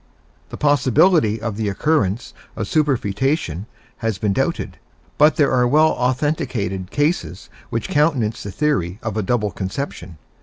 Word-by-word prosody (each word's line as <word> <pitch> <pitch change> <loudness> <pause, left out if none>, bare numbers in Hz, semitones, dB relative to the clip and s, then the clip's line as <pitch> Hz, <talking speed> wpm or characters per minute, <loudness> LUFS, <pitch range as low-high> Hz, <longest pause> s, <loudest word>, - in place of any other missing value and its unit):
The - - -8
possibility 145 - +3
of 110 -2 -4
the 110 -2 -1
occurrence 105 -2 0 0.2
of - - -3
superfoetation 130 - 0 0.3
has 115 -4 -2
been 100 +1 0
doubted, - - -2 0.4
but 150 0 +6
there 145 -3 +3
are 125 -1 +3
well 155 +5 +5
authenticated 125 - -1
cases 145 - -1 0.2
which 115 -2 -2
countenance 145 -8 +1
the 100 - -6
theory 100 - -1
of 110 -3 -3
a 110 - 0
double 105 0 0
conception. 95 - -5
120 Hz, 140 wpm, -20 LUFS, 100-145 Hz, 0.4 s, but